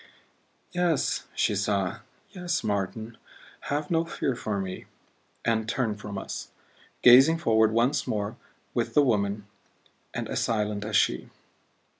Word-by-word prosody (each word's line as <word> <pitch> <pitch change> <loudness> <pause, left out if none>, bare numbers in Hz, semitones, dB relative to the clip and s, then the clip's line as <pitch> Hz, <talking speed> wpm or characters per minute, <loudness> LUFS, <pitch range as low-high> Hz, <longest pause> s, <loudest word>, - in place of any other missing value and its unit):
"Yes," 175 -5 0
she - - +2
sighed; 100 -3 0 0.3
"yes, 180 -7 -2
Martin 110 +2 -3 0.5
have 145 +2 -1
no 165 -1 +3
fear 155 -5 -2
for 105 -3 -2
me 95 -1 -5 0.3
" - - -28
And 110 -1 +1
turned 115 -4 -1
from 105 -1 -6
us, - - -6 0.5
gazing 135 +7 +8
forward 110 -7 +3
once 120 +4 +1
more 105 +1 -2 0.4
with 115 -1 -1
the 150 - +6
woman 105 -4 0 0.7
and - - -4
as - - -2
silent 105 -2 -1
as 110 0 -2
she. - - +2
110 Hz, 135 wpm, -27 LUFS, 105-135 Hz, 0.7 s, gazing